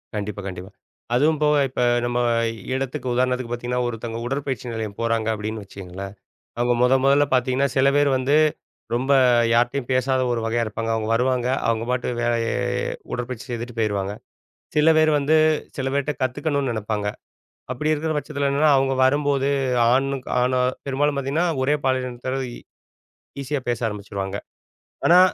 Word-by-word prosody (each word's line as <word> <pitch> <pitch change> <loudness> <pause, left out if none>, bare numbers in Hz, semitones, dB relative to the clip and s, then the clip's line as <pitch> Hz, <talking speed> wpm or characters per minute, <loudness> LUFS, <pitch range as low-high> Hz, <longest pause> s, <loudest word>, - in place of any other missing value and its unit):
கண்டிப்பா, 105 0 -4
கண்டிப்பா. 90 0 -7 0.4
அதுவும் 150 +4 +3
போக 150 0 +4
இப்ப 125 - -3 0.2
நம்ம 120 0 0 0.5
இடத்துக்கு 130 0 -3
உதாரணத்துக்கு 125 -1 0
பாத்தீங்கன்னா, 120 +1 -2
"ஒருத்தங்க 115 0 -5
உடற்பயிற்சி 135 0 -3
நிலையம் 110 -3 -5
போறாங்க." 115 -1 0
அப்படீன்னு 110 0 -4
வச்சுக்கங்களேன். 95 0 -8 0.5
அவுங்க 120 0 +2
மொத 125 +1 +5
மொதல்ல 140 +1 +5
பாத்தீங்கன்னா, 130 +2 +2
சில 135 +1 +4
பேர் 145 0 +4
வந்து 130 +3 +1 0.6
ரொம்ப 130 +3 +1 0.4
யார்ட்டயும் 120 +2 +1
பேசாத 130 +1 +1
ஒரு 120 - 0
வகையா 115 +1 0
இருப்பாங்க. 115 +1 -3
அவுங்க 110 -1 -2
வருவாங்க, 125 0 +1 0.2
அவுங்க 115 0 0
பாட்டுக்கு 125 -1 -2
வேலை 120 0 +2 0.8
உடற்பயிற்சி 125 -1 -4
செய்துட்டு 120 0 -5
போயிருவாங்க. 100 -2 -1 0.6
சில 155 +2 +6
பேர் 155 0 +4
வந்து, 145 +3 +3 0.4
சில 135 -1 -1
பேர்ட்ட 140 +1 0
கத்துக்கணும்ன்னு 135 +1 -1
நெனப்பாங்க. 105 -1 -2 0.6
அப்படி 150 +5 -1
இருக்கிற 155 +1 -1
பட்சத்தில 140 0 -1
என்னன்னா, 145 +2 +4
அவுங்க 135 0 +1
வரும்போது 140 0 +2 0.4
ஆணுக்கு 135 0 0
ஆணோ 125 0 +2 0.3
பெரும்பாலும் 140 +1 +1
பாத்தீங்கன்னா, 140 +6 0 0.2
ஒரே 145 +3 +2
பாலினத்தாரோட 130 0 -1 1.0
ஈஸியா 140 +1 -2
பேச 120 -2 0
ஆரம்பிச்சுருவாங்க. 100 -2 -4 0.7
ஆனா 175 +2 +7
125 Hz, 140 wpm, -23 LUFS, 115-140 Hz, 1.0 s, ஆனா